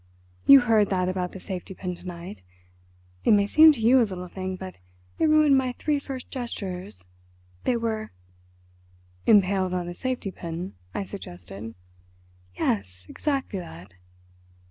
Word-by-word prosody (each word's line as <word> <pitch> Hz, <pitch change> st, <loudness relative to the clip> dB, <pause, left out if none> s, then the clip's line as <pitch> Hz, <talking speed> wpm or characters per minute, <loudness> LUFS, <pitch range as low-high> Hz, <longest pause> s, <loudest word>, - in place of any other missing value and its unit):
You 275 Hz, -1 st, +10 dB
heard 220 Hz, -4 st, +3 dB
that 185 Hz, -2 st, +1 dB
about 185 Hz, -1 st, -2 dB
the 190 Hz, -, -9 dB
safety 185 Hz, 0 st, -6 dB
pin 180 Hz, -1 st, -4 dB
to 180 Hz, -, -11 dB
night. 175 Hz, +2 st, -8 dB, 0.8 s
It -, -, +5 dB
may 200 Hz, -1 st, +4 dB
seem 310 Hz, +9 st, +8 dB
to 265 Hz, -, -8 dB
you 240 Hz, +4 st, +5 dB
a -, -, +5 dB
little 185 Hz, -5 st, -2 dB
thing, 185 Hz, +1 st, -5 dB
but 185 Hz, 0 st, -8 dB, 0.4 s
it 320 Hz, -, +4 dB
ruined 305 Hz, -3 st, +5 dB
my 255 Hz, -1 st, -1 dB
three 295 Hz, -2 st, 0 dB
first 265 Hz, -2 st, -7 dB
gestures. 190 Hz, -, -6 dB, 0.6 s
They 245 Hz, -, +2 dB
were—" 225 Hz, -2 st, -2 dB, 1.2 s
"Impaled 190 Hz, -3 st, +4 dB
on 175 Hz, -1 st, -2 dB
a 175 Hz, -, -5 dB
safety 250 Hz, 0 st, -3 dB
pin," 170 Hz, +1 st, -6 dB, 0.2 s
I -, -, -1 dB
suggested. 105 Hz, -, -9 dB, 0.8 s
"Yes, 95 Hz, -3 st, -2 dB
exactly 270 Hz, -9 st, -2 dB
that. 90 Hz, -, -11 dB
190 Hz, 145 wpm, -26 LUFS, 180-245 Hz, 1.2 s, You